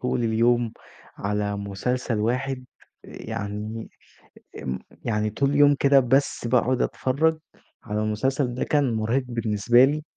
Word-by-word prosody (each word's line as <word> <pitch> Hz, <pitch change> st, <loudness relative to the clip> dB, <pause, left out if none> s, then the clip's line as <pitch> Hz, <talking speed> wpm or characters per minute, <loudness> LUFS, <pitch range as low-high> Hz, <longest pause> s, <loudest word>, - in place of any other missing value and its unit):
طول 125 Hz, -1 st, -1 dB
اليوم 115 Hz, +1 st, +2 dB, 0.4 s
على 105 Hz, 0 st, -2 dB
مسلسل 110 Hz, +4 st, -2 dB
واحد، 130 Hz, +4 st, -1 dB, 0.4 s
يعني 110 Hz, 0 st, -6 dB, 0.8 s
م 65 Hz, -1 st, -2 dB, 0.3 s
يعني 105 Hz, -2 st, 0 dB
طول 140 Hz, +6 st, 0 dB
اليوم 145 Hz, 0 st, +5 dB
كده 140 Hz, -1 st, +5 dB
بس 130 Hz, -1 st, +1 dB
باقعد 125 Hz, +1 st, +2 dB
أتفرّج 155 Hz, +5 st, +1 dB, 0.4 s
على 105 Hz, +1 st, -2 dB
المسلسل 125 Hz, +4 st, 0 dB
ده -, -, -1 dB
كان 145 Hz, -5 st, +1 dB
مرهق 115 Hz, +4 st, 0 dB
بالنسبة 120 Hz, +1 st, +3 dB
لي، 150 Hz, +2 st, -1 dB
120 Hz, 125 wpm, -24 LUFS, 110-135 Hz, 0.8 s, اليوم